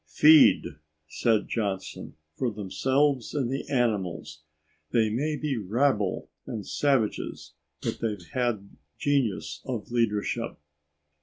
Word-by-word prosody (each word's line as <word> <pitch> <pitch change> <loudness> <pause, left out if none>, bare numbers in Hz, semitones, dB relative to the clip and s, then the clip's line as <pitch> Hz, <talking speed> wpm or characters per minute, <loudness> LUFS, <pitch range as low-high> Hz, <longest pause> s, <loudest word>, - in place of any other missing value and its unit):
"Feed," 155 +1 +7 0.4
said 110 +5 +1
Johnson, 100 -4 -3 0.2
"for 125 - 0
themselves 130 +7 0
and 130 -4 0
the 135 - -4
animals 95 - -1 0.5
they 110 -2 +2
may 150 +7 0
be 150 -3 -2
rabble 105 0 0 0.2
and 110 -3 -5
savages, 135 -7 -1 0.3
but - - -2
they've 105 -6 -2
had 120 - -2 0.2
genius 110 - 0
of 120 -4 -5
leadership." 110 -4 0
115 Hz, 105 wpm, -27 LUFS, 105-135 Hz, 0.5 s, Feed